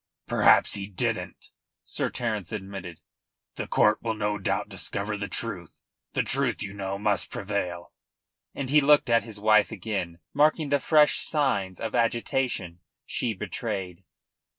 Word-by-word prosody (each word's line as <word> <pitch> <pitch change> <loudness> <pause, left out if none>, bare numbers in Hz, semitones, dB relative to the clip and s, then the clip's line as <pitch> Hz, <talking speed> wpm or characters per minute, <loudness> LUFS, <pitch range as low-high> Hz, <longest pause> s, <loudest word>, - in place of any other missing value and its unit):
"Perhaps - - +5
he 100 -1 +1
didn't," 100 - -2 0.3
Sir - - -2
Terence 110 -7 -3
admitted. 95 -5 -7 0.5
"The - - -5
court 105 0 +3
will 110 -1 -2
no 105 -1 -1
doubt 95 - -1
discover 105 +1 -3
the 100 0 -4
truth. 95 -4 -5 0.3
The - - +1
truth, 130 -4 0
you 100 -1 -6
know, 100 -1 -4
must 105 -2 0
prevail," - - -4 0.6
and 135 -2 -3
he 150 0 +6
looked 145 -3 +4
at 115 0 +5
his 110 -3 -9
wife 110 +1 +4
again, 95 -5 -4 0.2
marking 150 +1 +3
the 145 0 +3
fresh 150 +1 +4
signs 100 - 0
of 110 -1 -4
agitation 115 -6 0 0.3
she 115 -3 -1
betrayed. 95 -3 -4
105 Hz, 145 wpm, -27 LUFS, 95-120 Hz, 0.6 s, he